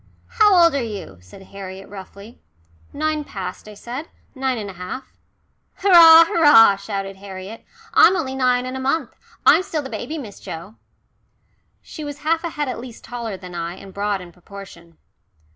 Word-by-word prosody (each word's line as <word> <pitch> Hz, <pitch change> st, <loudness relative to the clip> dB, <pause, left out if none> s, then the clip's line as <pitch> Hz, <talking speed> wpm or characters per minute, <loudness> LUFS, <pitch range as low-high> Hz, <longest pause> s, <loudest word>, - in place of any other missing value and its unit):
"How 420 Hz, -3 st, +4 dB
old 335 Hz, -3 st, +5 dB
are 280 Hz, -, 0 dB
you?" 200 Hz, -, -7 dB
said 90 Hz, -, -15 dB
Harriet 195 Hz, 0 st, -10 dB
roughly. 200 Hz, +3 st, -12 dB, 0.5 s
"Nine 310 Hz, 0 st, -2 dB
past," 190 Hz, -6 st, -7 dB
I 210 Hz, -, -12 dB
said. 250 Hz, +9 st, -7 dB, 0.3 s
"Nine 265 Hz, -2 st, -2 dB
and 205 Hz, -3 st, -5 dB
a -, -, -14 dB
half." 185 Hz, +9 st, -8 dB, 0.6 s
"Hurrah! 335 Hz, -4 st, +8 dB
Hurrah!" 295 Hz, -, +6 dB
shouted 195 Hz, -1 st, -5 dB
Harriet. 195 Hz, +2 st, -9 dB, 0.3 s
"I'm 375 Hz, -, +6 dB
only 270 Hz, -7 st, -3 dB
nine 250 Hz, -1 st, +1 dB
and 255 Hz, +1 st, -5 dB
a -, -, -4 dB
month. 270 Hz, +1 st, -1 dB, 0.3 s
I'm -, -, +6 dB
still 320 Hz, -5 st, -4 dB
the 265 Hz, -, -8 dB
baby, 320 Hz, -, -5 dB
Miss 220 Hz, -9 st, -9 dB
Joe." 170 Hz, +6 st, -9 dB, 1.1 s
She 310 Hz, -, -9 dB
was 290 Hz, 0 st, -7 dB
half 325 Hz, +1 st, +1 dB
a 340 Hz, -, -2 dB
head 295 Hz, -2 st, -3 dB
at 255 Hz, -, -4 dB
least 235 Hz, -1 st, -11 dB
taller 235 Hz, -5 st, -6 dB
than 180 Hz, -1 st, -11 dB
I, 170 Hz, 0 st, -5 dB
and 195 Hz, 0 st, -13 dB
broad 200 Hz, -1 st, -2 dB
in 175 Hz, -1 st, -12 dB
proportion. 175 Hz, -2 st, -13 dB
230 Hz, 175 wpm, -21 LUFS, 195-295 Hz, 1.1 s, Hurrah